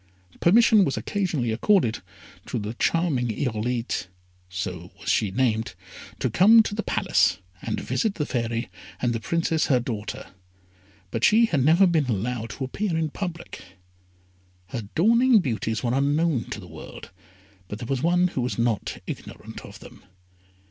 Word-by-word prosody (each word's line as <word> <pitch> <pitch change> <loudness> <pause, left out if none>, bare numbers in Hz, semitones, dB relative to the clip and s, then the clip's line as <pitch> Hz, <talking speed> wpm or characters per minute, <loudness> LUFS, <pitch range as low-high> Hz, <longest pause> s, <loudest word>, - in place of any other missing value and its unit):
Permission 220 +3 +5
was 140 - -1
occasionally 165 - -1
accorded 120 - +2 0.5
to - - -3
the 105 +1 -4
charming 145 -2 +1
Irolite 120 -2 -2 0.4
(so 90 -1 -5
was - - -5
she 105 - +2
named), 110 -1 0 0.4
to - - 0
come 210 - +6
to 205 - -4
the 215 - -1
Palace, - - +2 0.3
to - - -3
visit 220 -3 -1
the 150 - -1
Fairy 115 -2 -2 0.3
and 120 -1 0
the 115 - -2
Princess 165 +4 0
her 130 -4 +3
daughter, 110 -3 -5 0.8
but 115 - -3
she 225 +2 +6
had 150 - +1
never 165 +7 +5
been 165 -5 +2
allowed 115 +1 -2
to 135 - -6
appear 170 +6 -2
in 160 -2 -1
public. 175 -1 -6 1.1
Her 115 -6 -5
dawning 235 +7 +5
beauties 110 - -2
were 120 -1 0
unknown 145 0 +1
to - - -6
the 90 - -11
world, 80 -2 -11 0.6
but 105 - -6
there 120 - -7
was 135 -1 -1
one 175 +3 +3
who 130 - -3
was 125 - -2
not 115 -3 -1
ignorant - - -8
of - - -12
them. - - -14
130 Hz, 155 wpm, -25 LUFS, 115-175 Hz, 1.1 s, come